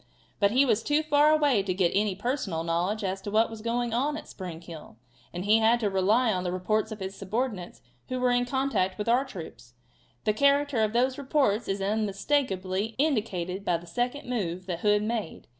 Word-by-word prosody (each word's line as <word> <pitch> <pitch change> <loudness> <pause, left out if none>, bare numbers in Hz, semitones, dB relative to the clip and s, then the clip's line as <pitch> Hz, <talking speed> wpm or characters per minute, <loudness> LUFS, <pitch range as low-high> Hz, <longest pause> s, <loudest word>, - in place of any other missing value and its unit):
But 200 -1 +4
he 260 +6 +4
was 230 -4 +2
too 295 +5 +1
far 300 -1 +4
away 290 -8 +3
to 190 -2 -2
get 180 -3 +2
any 200 -1 +1
personal 205 - -2
knowledge 175 +6 -1
as 190 0 -2
to 205 - -5
what 220 +2 +2
was 225 -1 -8
going 235 +1 -1
on 285 +5 0
at - - -9
Spring 180 -4 -7
Hill, 165 -9 -11 0.3
and 175 +2 -5
he 215 +2 +5
had 225 +2 +4
to 205 -2 0
rely 215 +5 +3
on 180 -1 -2
the 180 - -2
reports 215 +4 -1
of 215 - -6
his 190 0 -5
subordinates 195 - -4 0.3
who 255 - -2
were 250 0 +2
in 245 0 +2
contact 245 -8 0
with 210 - -4
our 245 +3 +3
troops. 160 - -10 0.5
The 215 - +2
character 280 0 +3
of 215 0 0
those 255 +3 +1
reports 265 -6 +1
is 195 0 -2
unmistakably 205 -1 -1
indicated 200 - -1
by 175 -3 +1
the 170 - -12
second 245 +10 -3
move 185 -7 -3
that 175 -3 -4
Hood 210 +1 +2
made. 215 -6 -3
215 Hz, 205 wpm, -27 LUFS, 185-250 Hz, 0.5 s, he